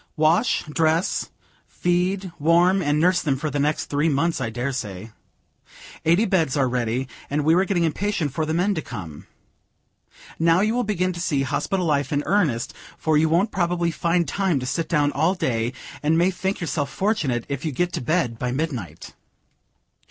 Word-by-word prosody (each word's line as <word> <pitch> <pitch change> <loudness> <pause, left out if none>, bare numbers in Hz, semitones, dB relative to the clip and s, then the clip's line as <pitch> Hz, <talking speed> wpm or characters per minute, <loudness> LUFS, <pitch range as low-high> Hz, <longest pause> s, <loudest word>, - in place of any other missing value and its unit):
"Wash, 165 +9 +3
dress, 160 +3 0 0.4
feed, 180 +2 -1
warm 175 +5 +4
and 145 -2 +1
nurse 180 +2 +3
them 140 -4 0
for 150 +2 -3
the 145 - -1
next 150 +2 0
three 150 +3 +1
months, 160 +4 0
I - - -1
dare 120 +4 -3
say. 110 -4 -6 0.9
Eighty 170 +7 +4
beds 165 -9 +1
are 135 -2 +3
ready, 125 +1 -1 0.2
and 145 +1 -1
we 160 - +5
were 185 +3 +3
getting 185 -4 +1
impatient 165 -3 -1
for 160 - -1
the 155 +1 -1
men 190 +4 +2
to 160 - -2
come. 85 - -8 1.1
Now 165 +2 +4
you 215 +2 +2
will 245 +1 +1
begin 185 -4 0
to 170 - -7
see 145 -6 0
hospital 180 +8 -1
life 145 -4 0
in 145 0 0
earnest, 155 - +1 0.2
for 160 -1 +1
you 155 +1 +3
won't 180 +7 +2
probably 175 -1 0
find 170 +1 0
time 190 -7 0
to 125 - -5
sit 160 +6 -2
down 145 -3 +2
all 160 +7 +1
day, 115 -8 -1 0.3
and 155 +2 +2
may 175 +3 +3
think 190 +2 -3
yourself 155 -4 -2
fortunate 160 - -1
if 140 -1 -4
you 160 - -1
get 175 +6 -1
to 170 - -2
bed 125 -4 0
by 125 -1 -1
midnight. 125 - -4
160 Hz, 185 wpm, -23 LUFS, 140-180 Hz, 1.1 s, we